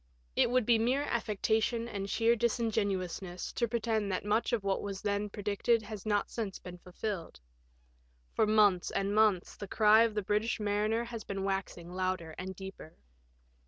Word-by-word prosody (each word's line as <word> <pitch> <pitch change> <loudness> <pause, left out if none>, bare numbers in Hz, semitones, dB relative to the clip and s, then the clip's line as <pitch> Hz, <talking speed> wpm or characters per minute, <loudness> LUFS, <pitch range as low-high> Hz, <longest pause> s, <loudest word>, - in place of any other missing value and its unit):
*' - - -37
It - - +4
would 250 -1 +2
be 230 -1 +4
mere 255 +5 +2
affectation 230 -1 0
and 200 -3 -4
sheer 230 +3 +3
disingenuousness 200 -6 -1
to 235 - 0
pretend 220 -3 -1
that 185 - -2
much 215 +3 +1
of 230 -4 0
what 195 -1 0
was 200 -1 -4
then 205 0 -1
predicted 210 +3 0
has 215 -1 -8
not 205 -1 +1
since 215 -5 -3
been 180 -1 -10
fulfilled. 180 0 -5 0.9
For 215 - +2
months 205 -4 +4
and 195 +1 -1
months 210 -4 +3
the 200 - -7
cry 215 +2 +5
of 230 -2 +2
the 210 - 0
British 210 +4 0
mariner 210 +2 0
has 235 -2 -6
been 195 -1 -4
waxing 190 -3 -3
louder 185 -3 -2
and 190 +1 -5
deeper. 190 -4 -9
210 Hz, 170 wpm, -31 LUFS, 195-225 Hz, 0.9 s, cry